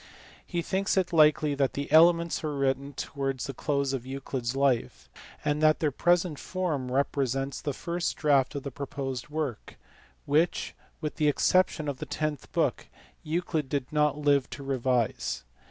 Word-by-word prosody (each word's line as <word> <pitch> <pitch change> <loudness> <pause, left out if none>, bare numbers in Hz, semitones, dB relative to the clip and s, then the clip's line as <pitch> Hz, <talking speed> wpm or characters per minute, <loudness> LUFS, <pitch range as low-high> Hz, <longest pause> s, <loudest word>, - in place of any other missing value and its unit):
He 170 -2 -2
thinks 195 +3 0
it 180 -1 +1
likely 150 -2 +5
that 140 -2 +1
the 140 0 -4
Elements 170 +1 +5
were 150 -2 -3
written 140 +1 0
towards 135 -2 -3
the 135 - -5
close 140 0 -1
of 130 -3 -3
Euclid 135 -1 -5
s 120 +2 -1
life, 125 - 0 0.4
and 145 +1 +1
that 155 0 +4
their 150 -2 +1
present 175 +1 +1
form 155 -9 -2
represents 135 0 -1
the 145 - -2
first 170 +5 -3
draft 145 -2 +2
of 140 - -4
the 140 - -5
proposed 135 -1 -5
work, 150 -7 -4 0.5
which, 160 +4 +1 0.3
with 150 -1 -4
the 155 -2 +2
exception 155 +1 +2
of 140 -3 -3
the - - -5
tenth 155 -3 -3
book, - - 0 0.3
Euclid 160 -3 -2
did 140 0 -3
not 150 -1 +2
live 145 -3 +2
to 140 - -8
revise. 125 - 0
145 Hz, 165 wpm, -28 LUFS, 135-155 Hz, 0.5 s, likely